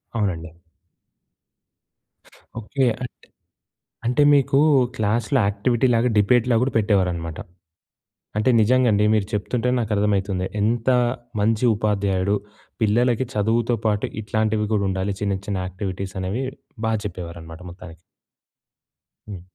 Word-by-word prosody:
అవునండి. 90 -7 -2 2.1
ఓకే. 130 +5 -1 0.2
అంటే, 125 - -9 0.8
అంటే 125 +5 +2
మీకు 135 -1 +2 0.4
క్లాస్‌లో 115 +5 +1
యాక్టివిటీలాగా 120 +3 +1
డిబేట్‌లాగా 115 +3 +3
కూడా 135 - -1
పెట్టేవారనమాట. 90 -6 0 1.0
అంటే 110 +4 +2
నిజంగా 125 +3 +3
అండి. 105 0 +2
మీరు 105 -2 +1
చెప్తుంటే 115 +4 -1
నాకు 115 -2 -2
అర్థ‌మైతుంది. 100 -2 0 0.2
ఎంత 115 +3 0 0.5
మంచి 110 +3 +1
ఉపాధ్యాయుడు. 100 -2 0 0.5
పిల్లలకి 120 +3 +2
చదువుతో 115 +3 +1
పాటు 105 -1 +1 0.2
ఇట్లాంటివి 110 0 0
కూడా 105 -2 +1
ఉండాలి. 95 +1 -2
చిన్న 100 -2 0
చిన్న 100 -2 -2
యాక్టివిటీస్ 95 0 -5
అనేవి 100 +8 -2 0.4
బా 110 - +1
చెప్పేవారనమాట 85 -3 -7
మొత్తానికి. 85 -2 -12 1.3
హ్మ్. 95 -4 -7
105 Hz, 105 wpm, -22 LUFS, 95-115 Hz, 2.1 s, డిబేట్‌లాగా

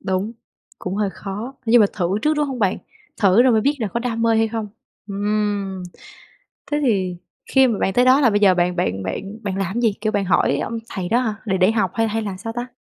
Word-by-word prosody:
Đúng, 190 +4 -2 0.5
cũng 185 - -4
hơi 210 -2 0
khó, 210 +7 -7
nhưng 230 +1 +6
mà 205 - +6
thử 185 +2 -1
trước, 305 +1 +2
đúng 295 -1 +1
không 265 -2 -5
bạn? 195 -4 +1 0.4
Thử 200 +3 +5
rồi 255 -2 +4
mới 220 - +3
biết 280 +6 +1
là 220 - -2
có 235 - -3
đam 230 -2 -2
mê 230 -1 +3
hay 225 0 +2
không. 220 -2 -4 0.4
Ừm, 205 -1 -2 0.9
thế 295 - +1
thì 190 -8 0 0.3
khi 265 -1 +5
mà 220 -4 -1
bạn 190 - 0
tới 250 +1 +4
đó 265 +3 +5
là 245 - +5
bây 205 -1 +2
giờ 195 -3 +5
bạn 180 0 +1
bạn 95 - -1
bạn 195 - -5
bạn 195 -2 -3
làm 195 -1 -2
cái 240 - -1
gì, 220 -4 +3
kiểu, 215 0 0
bạn 200 -1 0
hỏi 185 - +2
ông 230 - -3
thầy 185 -2 -4
đó 235 - +3
hả, 220 -4 -1
để 190 -3 0
để 185 +3 +4
học 210 -6 0
hay 225 -1 +1
hay 220 +1 -2
là 200 -3 -5
sao 225 +4 -6
ta? 240 +1 -4
210 Hz, 255 wpm, -21 LUFS, 190-230 Hz, 0.9 s, nhưng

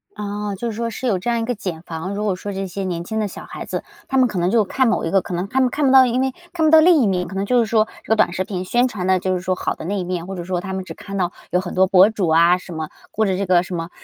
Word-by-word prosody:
哦， 205 -1 -4
就 230 +3 -3
是 - - -7
说 230 +1 -2
是 250 +3 -6
有 200 -7 +1
这 210 - -3
样 235 -1 +1
一 225 - -2
个 245 - -1
茧 185 -6 -5
房。 170 +4 -5
如 210 - -2
果 205 -3 0
说 205 +3 -6
这 195 0 -3
些 195 +2 -5
年 170 -2 -3
轻 220 +5 -3
的 210 - 0
小 - - -9
孩 - - -8
子， - - -4 0.2
他 265 - 0
们 255 -1 +5
可 195 -5 -3
能 175 +1 +1
就 220 -1 +3
看 260 +5 +1
某 225 - +1
一 165 - -2
个 195 -1 +3
可 180 - -7
能 180 +3 -2
他 260 +6 -1
们 255 - +3
看 290 +3 -1
不 265 - +4
到 265 -1 +8
因 250 +2 0
为 265 -1 0 0.2
看 320 -3 +1
不 310 - +4
到 320 - +9
另 330 -1 +6
一 - - +3
面。 180 -2 0
可 190 - -8
能 195 +1 -1
就 245 +3 +3
是 230 - +3
说 220 0 +2 0.2
这 - - -17
个 220 - +4
短 175 - +2
视 185 - -1
频 185 -1 -5
宣 245 +5 +2
传 200 -7 -5
的 185 0 +3
就 185 +1 -1
是 180 - -3
说 185 0 0
好 - - -2
的 - - -9
那 200 +3 -2
一 - - -2
面， 175 -1 -3
或 195 +1 -6
者 175 - -5
说 180 0 -2
他 190 +1 -5
们 190 0 -3
只 - - -8
看 200 -1 -7
到 180 -2 0 0.2
有 180 +1 +2
很 180 - -6
多 190 +1 +5
博 190 +2 +6
主 205 -6 -1
啊 170 +2 +5
什 180 0 -12
么， 160 -1 -4 0.2
过 220 - +1
着 185 -1 0
这 200 - -1
个 180 -2 +4
什 180 0 -6
么， 165 0 -4
195 Hz, 385 characters per minute, -20 LUFS, 180-225 Hz, 0.2 s, 到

